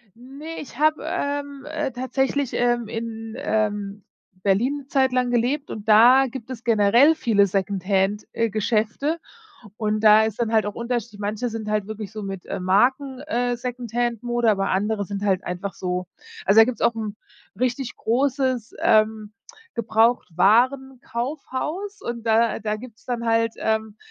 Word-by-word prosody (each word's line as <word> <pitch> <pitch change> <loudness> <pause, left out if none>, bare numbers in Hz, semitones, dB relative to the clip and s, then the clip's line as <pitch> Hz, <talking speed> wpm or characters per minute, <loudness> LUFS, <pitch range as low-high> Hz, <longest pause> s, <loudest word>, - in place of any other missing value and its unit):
Ne, 275 +7 -9
ich 260 - -10
habe, 310 +1 +2
ähm, 285 -1 -3
äh, 300 -2 -3
tatsächlich, 265 +2 -1
ähm, 240 -1 +1
in, 225 0 -6
ähm, 205 -2 -2 0.4
Berlin 225 +9 +2
'ne 270 - -19
Zeit 265 -2 +2
lang 250 -1 +1
gelebt 250 +5 0
und 215 0 -7
da 240 +5 +7
gibt 245 -1 -8
es 240 -2 -7
generell 230 +7 +5
viele 220 -9 +3
Secondhand, 195 +1 0
äh, 230 0 0
Geschäfte 220 +9 0 0.6
und 215 -1 -1
da 215 0 +7
ist 220 +1 -3
dann 230 -1 0
halt 220 -1 +3
auch 205 - -4
Unterschied, 235 -3 -4
manche 210 +4 -2
sind 225 -2 -5
halt 210 -2 0
wirklich 215 -2 -6
so 215 0 -7
mit, 195 -2 -6
äh, - - -4
Marken, 255 +9 +1
äh, 245 -5 -1
Secondhand-Mode, 240 -1 -1
aber 195 -2 0
andere 205 +2 0
sind 200 0 -5
halt 195 -2 +1
einfach 180 +2 -4
so 180 -1 -3 0.4
also 195 +3 +5
da 225 - +10
gibt's 245 +1 -4
auch 235 - +3
'n 215 -2 -4 0.5
richtig 255 0 -1
großes, 260 -1 0
ähm, 215 -1 +2 0.4
Gebrauchtwarenkaufhaus 255 - 0
und 235 - -5
da 225 0 +3
da 210 0 -2
gibt's 235 0 -13
dann 240 -2 -3
halt, 230 0 +2
ähm, 220 -1 -1
230 Hz, 155 wpm, -23 LUFS, 210-255 Hz, 0.6 s, da